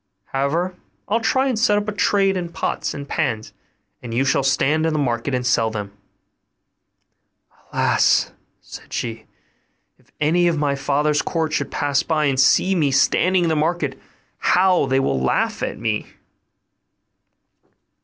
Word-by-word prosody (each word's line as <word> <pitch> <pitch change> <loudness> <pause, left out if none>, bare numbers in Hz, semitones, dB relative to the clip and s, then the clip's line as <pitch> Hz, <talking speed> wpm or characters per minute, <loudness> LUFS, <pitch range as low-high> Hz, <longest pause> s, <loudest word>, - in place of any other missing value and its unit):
However, 155 +7 0 0.3
I'll 220 +3 +1
try 260 +4 +1
and 250 -5 -1
set 210 -2 +3
up 205 0 -2
a - - -1
trade 195 -1 +2
in 175 -2 -3
pots - - -3
and 140 -1 -7
pans, 125 -10 -2 0.5
and 115 -2 -6
you 135 +3 +1
shall 140 - +2
stand 145 +4 +1
in 160 - -1
the - - 0
market 125 0 -1
and 125 0 -2
sell 115 -2 +2
them.' 100 -2 -6 1.8
'Alas!' - - +2 0.3
sighed - - -12
she, 115 -2 -4 0.7
'if - - -29
any 170 +4 +2
of 170 -2 +1
my 145 -1 0
father's 145 +1 0
court 160 -2 -2
should - - -1
pass 145 -2 0
by 155 -2 0
and 135 -2 0
see 185 +8 +4
me 155 -6 +2
standing 180 +6 +2
in 170 - +1
the 160 - +1
market, 155 -3 -1 0.4
how 180 -5 +3
they 135 0 +2
will 65 - 0
laugh 65 - 0
at - - -3
me! 110 -2 -2
150 Hz, 155 wpm, -21 LUFS, 135-175 Hz, 1.8 s, see